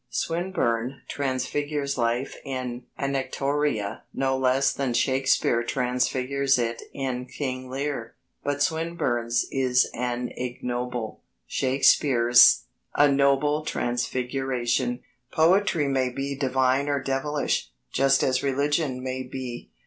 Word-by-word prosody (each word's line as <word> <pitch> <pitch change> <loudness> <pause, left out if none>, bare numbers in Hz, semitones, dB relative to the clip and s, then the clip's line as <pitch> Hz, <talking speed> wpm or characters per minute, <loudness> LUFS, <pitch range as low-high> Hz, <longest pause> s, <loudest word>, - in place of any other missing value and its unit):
Swinburne 140 -8 -1
transfigures 140 +1 -2
life 120 +2 -1
in 130 -2 -5
Anactoria 140 -5 -1
no 135 0 +1
less 130 +1 +2
than 130 -4 -2
Shakespeare 130 -3 +2
transfigures 125 +2 0
it 115 -1 -2
in 130 -2 -3
King 130 -1 -4
Lear. 135 -3 -4 0.3
But 145 0 0
Swinburne's 135 -8 0
is 130 -2 +2
an 125 0 -2
ignoble, 125 -2 -4 0.2
Shakespeare's 130 -2 +5 0.3
a 145 -1 +5
noble 140 +2 +2
transfiguration. 125 -1 -1 0.3
Poetry 170 -2 +3
may 130 -2 +1
be 135 +2 -4
divine 130 +1 +1
or 145 -1 +1
devilish, 135 - -1 0.2
just 135 0 +3
as 130 -1 +1
religion 140 -1 0
may 130 0 -3
be. 125 -2 -7
130 Hz, 105 wpm, -25 LUFS, 125-140 Hz, 0.3 s, Shakespeare's